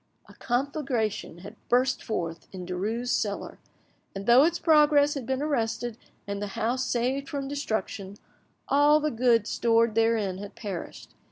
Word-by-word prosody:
A - - -15
conflagration 250 - -2
had - - -9
burst 255 +2 +2
forth 170 -6 -4
in 185 -2 -7
Derues' 215 +7 -3
cellar, 200 -2 -2 0.6
and 195 0 -5
though 245 +5 +7
its 340 +1 +1
progress 295 -2 +4
had 270 -5 -6
been 265 +1 -1
arrested 240 -5 -1 0.3
and 200 0 -4
the 205 - -2
house 250 +4 0
saved 260 +3 -1
from 280 -1 -3
destruction, 220 -8 -4 0.5
all 290 +2 +5
the 305 0 -1
goods 230 -2 +2
stored 230 -1 +2
therein 220 -4 +1
had 205 0 -9
perished. 195 -5 -7
235 Hz, 150 wpm, -27 LUFS, 205-275 Hz, 0.6 s, though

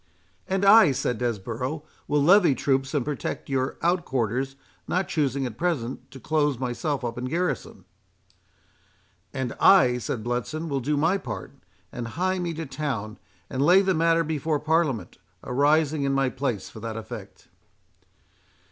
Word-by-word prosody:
— - - -39
"And 190 +1 0
I," 200 -7 +7
said 125 -2 -2
Desborough, 120 +5 -3 0.2
"will 145 -1 +2
levy 175 -3 +6
troops 135 +1 0
and 140 - 0
protect 145 -1 -4
your 130 -1 -1
out 175 +1 +2
quarters, 130 - -1 0.3
not 185 +1 0
choosing 140 -4 0
at 120 -3 -6
present 145 -9 -2
to 135 - -11
close 145 0 +1
myself 130 +2 -2
up 120 0 -4
in 125 - -4
garrison"— 175 +7 -3 1.5
"And 130 -3 -3
I," 125 -11 +6
said 115 -1 -4
Bletson, 125 +7 -3
"will 140 -1 0
do 145 +4 -1
my 165 +7 +2
part, - - -6 0.4
and 120 - -5
hie 185 +1 0
me 170 -2 -3
to 165 +1 -4
town 130 -7 -4 0.3
and 130 - -3
lay 180 +7 +6
the 190 -1 +2
matter 165 0 +3
before 155 -1 -1
Parliament, 150 - 0 0.2
arising 145 +3 +2
in 140 0 +1
my 135 -1 +2
place 125 -7 -3
for - - -11
that 115 0 -5
effect." 110 - -9
140 Hz, 155 wpm, -25 LUFS, 125-165 Hz, 1.5 s, I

